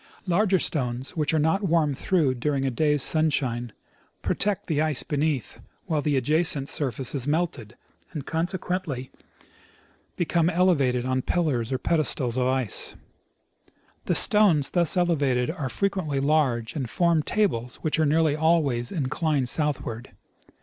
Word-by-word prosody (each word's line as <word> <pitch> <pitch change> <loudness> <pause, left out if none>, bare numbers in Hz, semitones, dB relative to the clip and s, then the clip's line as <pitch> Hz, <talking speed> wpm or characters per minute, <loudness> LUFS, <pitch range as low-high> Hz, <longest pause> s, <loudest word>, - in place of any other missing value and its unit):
Larger 190 +2 +2
stones, 130 -6 -2
which 150 -3 0
are 160 - +1
not 160 +6 +1
warmed 165 -6 +1
through 155 -3 +1
during 135 +2 -1
a 135 - 0
day's 150 +2 +1
sunshine, 130 -7 +1 0.5
protect 205 0 0
the 155 -4 0
ice 155 -3 +1
beneath 145 -6 -2 0.3
while 155 -5 -1
the 145 -1 0
adjacent 150 +1 +1
surface 135 -3 -1
is 140 -2 -2
melted, 145 -8 -2 0.4
and 150 -6 -6
consequently 170 -5 -3 1.0
become 170 -1 +1
elevated 145 -9 +2
on 130 0 0
pillars 135 -8 -1
or 130 - 0
pedestals 140 -5 +1
of 130 -1 +1
ice. 130 -6 0 1.1
The - - 0
stones 190 -10 +4
thus 175 0 +1
elevated 145 -7 +1
are 150 -6 -4
frequently 165 - -1
large, 135 -6 +1
and 130 -6 -3
form 170 -1 +2
tables 135 - -1
Avhich 155 0 0
are 155 - +3
nearly 155 0 +2
always 150 -7 +1
inclined 145 -3 -1
southward. 140 -7 -3
150 Hz, 135 wpm, -25 LUFS, 130-170 Hz, 1.1 s, stones